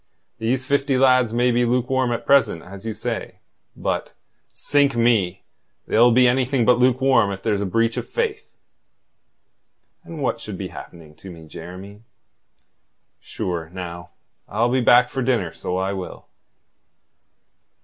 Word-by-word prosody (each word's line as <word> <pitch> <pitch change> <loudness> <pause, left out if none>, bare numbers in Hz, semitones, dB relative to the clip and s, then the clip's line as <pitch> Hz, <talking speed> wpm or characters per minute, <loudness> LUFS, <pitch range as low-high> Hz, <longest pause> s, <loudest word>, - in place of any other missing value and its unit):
These 125 +4 -1
fifty 140 -1 +1
lads 130 -3 +4
may 120 +2 +2
be 120 +1 +2
lukewarm 125 +1 0
at 120 - -3
present, 110 -12 +3
as 100 +4 -10
you 110 - -2
say, - - -4 0.4
but - - -3 0.4
sink 145 -2 +1
me! 115 -6 +1 0.4
they'll 120 +2 +4
be 125 +2 +5
anything 125 0 +1
but 125 0 +4
lukewarm 130 -3 +3
if 95 0 -7
there's 105 -3 0
a 100 - -1
breach 115 +4 0
of - - -4
faith." 440 -3 -3 1.5
"And 165 -2 -9
what 115 - -1
should 105 -4 -7
be 95 -1 -5
happening 80 -3 -12
to 95 - -11
me, 80 -3 -11
Jeremy? 95 +6 -10 1.2
Sure, 85 -3 -5
now, 85 -1 -8 0.4
I'll 115 +4 0
be 130 0 +2
back 125 +1 +5
for 135 - -4
dinner, 115 -10 0
so 90 +2 -4
I 95 +1 -1
will." 95 -2 -7
115 Hz, 145 wpm, -22 LUFS, 95-130 Hz, 1.5 s, be